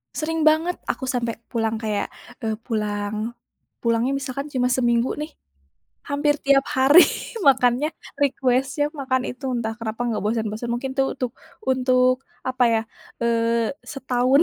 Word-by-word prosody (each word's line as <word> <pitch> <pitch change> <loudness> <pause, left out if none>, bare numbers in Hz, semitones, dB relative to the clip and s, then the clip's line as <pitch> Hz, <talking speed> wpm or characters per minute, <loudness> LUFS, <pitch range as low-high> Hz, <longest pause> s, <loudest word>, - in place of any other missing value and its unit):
Sering 325 +1 -1
banget 320 +3 +3
aku - - -2
sampai 240 -3 -1 0.2
pulang 225 -2 0
kayak, 215 -2 -1 0.4
eee 220 -1 0
pulang, 210 0 -2 0.5
pulangnya 235 +3 +2
misalkan 275 +1 -4
cuma 250 -1 +2
seminggu 240 -1 +2
nih, 300 +1 -4 0.8
hampir 290 +1 +2
tiap 275 0 +4
hari 275 +6 +8 0.5
makannya 255 +1 +4 0.3
request-nya 270 +1 +1
makan 260 -4 -1
itu, 265 +2 -7
entah 225 -2 -2
kenapa 225 0 -4
nggak 220 -3 -1
bosen-bosen. 220 +1 -1
Mungkin 265 +2 -3
itu 270 - +4
untuk, 250 -3 -3 0.3
untuk 255 -1 +3 0.3
apa 255 -1 +1
ya, 220 - +2 0.4
eee, 230 -1 +2
setahun. 260 +1 +2
250 Hz, 135 wpm, -23 LUFS, 230-275 Hz, 0.8 s, hari